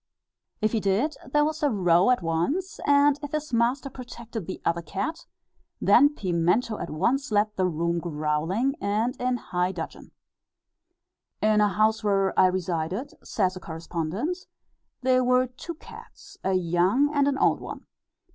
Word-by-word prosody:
If 215 0 +2
he 225 - +1
did, 210 +10 +1 0.2
there 295 +1 +4
was 310 +1 -3
a 295 - +3
row 180 -3 +3
at 250 -7 +2
once; 285 - -1
and 285 0 +4
if 290 -1 -7
his 305 -3 -3
master 240 +4 +1
protected 235 -6 -8
the 185 - -5
other 170 0 +1
cat, 275 - -4 0.5
then 290 +1 +5
Pimento 185 - 0
at - - -5
once 240 - 0
left 210 0 +2
the 185 -1 +1
room 170 0 -1
growling, 165 - -1
and 215 +5 0
in 250 0 +1
high 180 -4 -1
dudgeon. 170 -3 -7
(See - - -21
Note - - -30
T, - - -59
Addenda.) - - +4
"In 210 - +4
a - - -5
house 215 +1 +2
where 195 -2 +1
I 185 - +7
resided," 180 - -2
says 185 -3 0
a - - -6
correspondent 170 - -3
(see 365 - -16
Note - - -32
U, - - -56
Addenda), - - -50 0.2
"there 255 0 +4
were 250 +1 +3
two 270 +7 -8
cats, - - -14
a 190 - +1
young 185 - +2
and 285 -1 +3
an 280 -1 +1
old - - +3
one. - - -8
215 Hz, 185 wpm, -26 LUFS, 180-270 Hz, 0.5 s, I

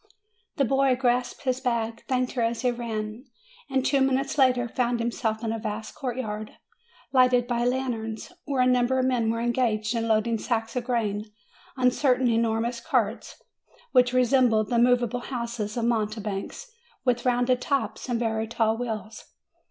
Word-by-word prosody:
The 280 - +2
lad 270 0 +2
grasped 245 0 0
his 255 -1 0
bag, 230 -3 -1
thanked 255 -1 0
her 245 - -2
as 230 +2 -1
he 250 - +3
ran, 225 0 -5 0.4
and 265 -1 0
two 275 -1 +2
minutes 270 +1 +1
later 250 -3 +3
found 240 0 0
himself 230 -1 -2
in 225 - -1
a 225 - -3
vast 215 0 -5
courtyard, 230 -6 -4 0.6
lighted 250 -2 +4
by 240 -1 -1
lanterns, 245 -3 -2
where 275 -3 +1
a - - +3
number 250 0 +3
of 255 - +2
men 245 -3 +1
were 230 +1 -1
en 240 0 +1
gaged 220 -3 0
in 230 -1 -1
loading 225 +1 +1
sacks 225 0 -2
of 245 -1 -2
grain 215 -4 -1 0.5
on 250 -1 +4
certain 255 -1 +2
enormous 230 +1 0
carts 235 -5 -2 0.5
which 250 -1 +4
resembled 250 -4 +3
the 235 - +3
movable 245 0 +3
houses 235 -3 -4
of 235 - 0
mounte 215 -2 0
banks, 210 - -5 0.3
with 245 -1 +1
rounded 250 0 +2
tops, 275 -1 -2
and 240 -1 0
very 225 -1 -1
tall 225 -1 +1
wheels. 220 -2 -5
240 Hz, 165 wpm, -26 LUFS, 225-255 Hz, 0.6 s, lighted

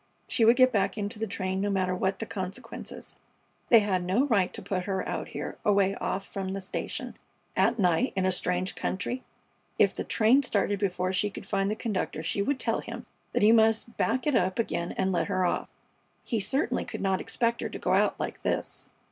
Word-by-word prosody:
She 235 - +3
would 230 +2 +7
get 255 0 +5
back 200 -2 +1
into 210 +1 -3
the 225 - -1
train, 190 -2 -2
no 205 - 0
matter 185 -2 +1
what 190 +1 0
the 225 - -4
consequences. 190 -2 -7 0.5
They 230 -2 +8
had 190 -3 0
no 195 +10 +2
right 205 -9 +2
to - - -6
put 185 -2 -2
her 190 -2 -2
out - - -3
here, - - -6
away 200 -2 +3
off 195 0 -3
from 195 -1 -5
the 195 - -3
station, 185 - -4 0.4
at 230 +1 +3
night, 185 +5 +2
in 190 -1 +1
a 185 - +3
strange 180 +1 -1
country. 245 +7 -3 0.6
If - - +4
the - - -4
train 230 +5 +4
started 205 -5 0
before 185 -2 0
she 205 +3 +1
could 200 - -9
find 195 0 0
the 210 - -1
conductor 200 -8 -3
she 200 - 0
would 270 +6 0
tell - - 0
him - - -7 0.3
that - - +2
he 215 - +7
must 225 +1 +3
back 250 +3 +1
it 295 - +2
up 185 -3 +2
again 175 -6 -1
and 190 - 0
let 175 - 0
her 185 -2 +1
off. 175 - -1 0.5
He 230 - -1
certainly 270 +9 0
could - - -6
not 190 -1 +1
expect 235 -1 0
her - - -2
to - - -6
get - - -1
out - - +2
like - - -4
this. - - -3
200 Hz, 215 wpm, -28 LUFS, 185-225 Hz, 0.6 s, They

